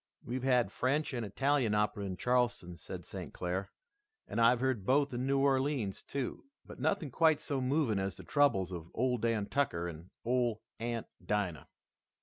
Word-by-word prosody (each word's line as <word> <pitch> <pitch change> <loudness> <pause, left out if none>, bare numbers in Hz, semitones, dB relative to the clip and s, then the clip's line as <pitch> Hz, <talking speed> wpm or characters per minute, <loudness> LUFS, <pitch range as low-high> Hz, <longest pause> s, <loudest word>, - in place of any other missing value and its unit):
"We've 125 +2 -3
had 125 -5 +3
French 140 +5 0
and 120 -2 -2
Italian 125 +1 +1
opera 105 -1 0
in 95 -2 -4
Charleston," 120 -6 +1
said - - -8
St. - - -7
Clair, 90 +2 -2 0.6
"and 115 - -1
I've 115 +1 +6
heard 130 -5 0
both 140 +5 +2
in 125 +2 -1
New 140 0 +3
Orleans, 135 -6 +1
too, 135 -3 -4 0.2
but - - -11
nothing 165 -9 0
quite 160 +2 +4
so 140 -3 -2
moving 130 -5 +1
as 95 -2 -2
the - - -10
troubles 100 - +2
of 85 -2 -6
Ole 125 0 +1
Dan 115 -2 +1
Tucker 100 -11 0
and 85 +1 -8 0.2
Ole 120 -2 +1 0.2
Aunt 115 0 -2 0.2
Dinah." 100 -6 -1
120 Hz, 170 wpm, -33 LUFS, 100-135 Hz, 0.6 s, I've